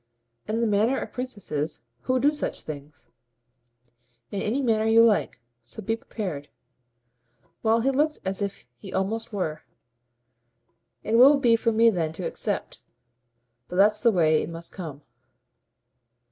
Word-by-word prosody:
"In 225 +2 -1
the - - +2
manner 220 +5 +2
of - - -6
princesses, 195 - -4 0.2
who 255 0 +2
do 290 +4 +3
such 295 - -3
things?" 145 -4 -10 1.2
"In 200 - -3
any 225 +6 -1
manner 220 -4 +1
you 225 +1 +6
like. 205 - +2 0.2
So 120 - -10
be 225 +4 0
prepared." 180 -11 -6 1.1
Well, 225 +1 +3
he 270 +3 +2
looked 300 +3 +1
as 190 +1 -2
if 200 -1 -4
he - - -10
almost 220 +5 -2
were. 180 -7 -3 1.4
"It 225 +2 +2
will 280 +3 +8
be 240 -4 +4
for 230 0 +1
me 230 +1 +5
then 165 -5 -2
to - - -5
accept. - - -3 0.9
But - - -7
that's 210 +3 +4
the 235 - +5
way 160 -5 +3
it - - -5
must 165 0 -7
come." 155 -6 -8
215 Hz, 145 wpm, -25 LUFS, 165-230 Hz, 1.4 s, will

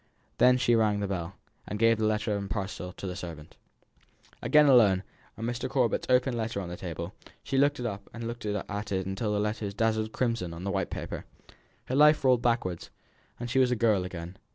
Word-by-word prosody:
Then 125 0 +6
she 120 -1 +2
rang 110 -3 +3
the 100 - -1
bell, 95 -1 -4 0.3
and 105 - -4
gave 115 0 +4
the 110 - +2
letter 105 0 0
and 100 -1 -4
parcel 100 -3 -4
to - - -9
the 90 -1 -4
servant. 85 -5 -8 0.9
Again 150 0 +5
alone, 110 -9 +5 0.3
and 115 +2 -3
Mr. 120 0 -3
Corbet's 125 -4 +1
open 125 0 +3
letter 115 -2 -2
on 90 -3 -5
the 90 - -5
table. 85 +1 -6 0.3
She 135 - 0
took 145 +1 +3
it 120 - -3
up 100 -3 -5
and 115 0 -7
looked 120 +1 -5
at 105 0 -3
it 95 0 -1
till 105 +1 -1
the 105 - +1
letters 105 -1 -2
dazzled 110 0 0
crimson 115 -10 -1
on 85 - -8
the 100 - -2
white 95 -1 -1
paper. - - -5 0.6
Her - - -4
life 150 +1 +6
rolled 125 -2 +5
backwards, 115 -8 -1 0.5
and 120 - -4
she 130 +2 +1
was 130 -1 +4
a 125 - +1
girl 110 -5 +2
again. 90 0 -7
105 Hz, 210 wpm, -28 LUFS, 95-120 Hz, 0.9 s, Then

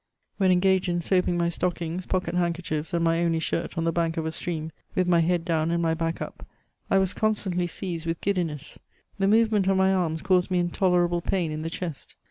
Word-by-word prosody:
When 190 -2 +3
engaged 185 0 +3
in 175 - 0
soi^ng 180 +1 +1
my 170 0 +1
stockings, 175 0 -3
pocket 185 -1 -1
handkerchie&, 170 -3 -1
and 170 -1 0
my 165 0 +2
only 165 -1 +1
shirt 165 +1 -2
on 165 - 0
the 165 0 +1
ba^ 165 -1 +1
o£ 165 -1 -3
a 160 - -1
stream, 160 -1 -4 0.2
with 185 -1 +2
my 175 -1 +4
head 170 0 +1
down 160 -2 +1
and 170 0 +1
my 165 -1 +1
back 165 0 -2
up, - - -9 0.5
I 195 - +4
was 190 -1 +2
constantly 195 -5 0
seized 170 -2 -5
with 165 0 -1
giddiness; 165 -7 -2 0.4
the 195 - +2
movement 215 -2 +3
of 195 0 +3
my 190 0 +4
arms 165 -4 -1
caused 180 -1 +2
me 185 - +1
in 175 -1 0
tolerable 175 -2 +2
pain 175 -2 -1
in 155 0 -4
the 165 - -3
chest. 165 -3 -6
175 Hz, 220 wpm, -26 LUFS, 165-185 Hz, 0.5 s, my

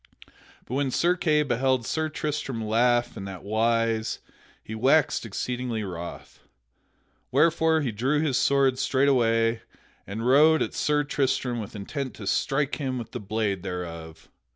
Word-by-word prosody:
But - - -8
when 140 0 0
Sir 175 +7 +2
Kay 150 -4 +2
beheld 130 -2 +1
Sir 155 +4 -1
Tristram 145 -7 -3
laugh 120 +2 +2
in 95 - -6
that 95 -2 -8
wise, 115 +1 0 0.5
he 110 - -8
waxed 130 +2 +2
exceedingly 120 +1 -3
wroth. 85 -3 -8 0.9
Wherefore 160 +3 +3
he 130 -5 -1
drew 130 +8 0
his 150 -4 0
sword 135 -1 +2
straightway, 120 -4 +2 0.5
and 110 +4 -4
rode 150 +5 +5
at - - -5
Sir 150 0 +1
Tristram 130 -4 -1
with 110 0 -7
intent 130 +6 -5
to 105 - -9
strike 135 +7 0
him 130 -2 -2
with 115 -3 -7
the - - -5
blade 105 -2 -2
thereof. 85 -3 -7
125 Hz, 145 wpm, -26 LUFS, 110-140 Hz, 0.9 s, rode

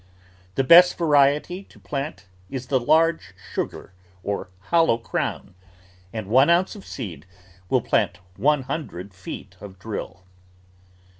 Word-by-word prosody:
The 135 - +2
best 175 +6 +8
variety 150 +2 +3
to - - -20
plant 140 -5 -5 0.2
is 130 +2 -5
the 130 0 +1
I^arge 155 - +2 0.2
Sugar - - -4 0.3
or 100 -2 -3 0.2
Hollow 165 -8 +4
Crown, 110 -3 -3 0.6
and 110 -2 -5
one 130 +7 +5
oimce 175 +4 +3
of 200 - -12
seed 90 - -7 0.4
will - - +3
plant 90 - +1 0.2
one 140 +5 +2
hundred 125 - -5
feet 95 +1 -9
of 95 -2 -10
drill. 100 -1 -6
135 Hz, 130 wpm, -24 LUFS, 100-160 Hz, 0.6 s, best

